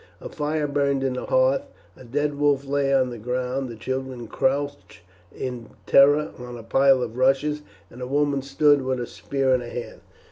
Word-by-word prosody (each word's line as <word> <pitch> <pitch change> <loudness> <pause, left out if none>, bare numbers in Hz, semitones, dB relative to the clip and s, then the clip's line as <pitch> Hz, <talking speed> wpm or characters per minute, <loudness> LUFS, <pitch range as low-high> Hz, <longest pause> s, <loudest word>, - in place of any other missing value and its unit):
A - - -8
fire 150 +1 -2
burned 140 -1 0
on 135 -1 0
the 125 - -5
hearth. 130 +1 +3 0.3
A - - -14
dead 145 +4 -2
wolf 145 -1 +2
lay 140 0 0
on 130 -2 +2
the 120 - -7
ground, 125 +3 -2
the 115 - -7
children 130 +1 -5
crouched 140 +4 -2 0.3
in 125 -1 -6 0.2
terror 145 +2 +5
on 125 0 -8
a 115 - -10
pile 135 +2 +4
of 115 0 -6
rushes, 135 +3 +2 0.3
and 125 - -11
a 125 - -4
woman 145 0 +1
stood 140 +1 +3
with 130 -1 -2
a 120 - -2
spear 135 +1 -1
in 125 - +2
her 120 - -7
hand. 120 - -7
135 Hz, 190 wpm, -24 LUFS, 125-140 Hz, 0.3 s, terror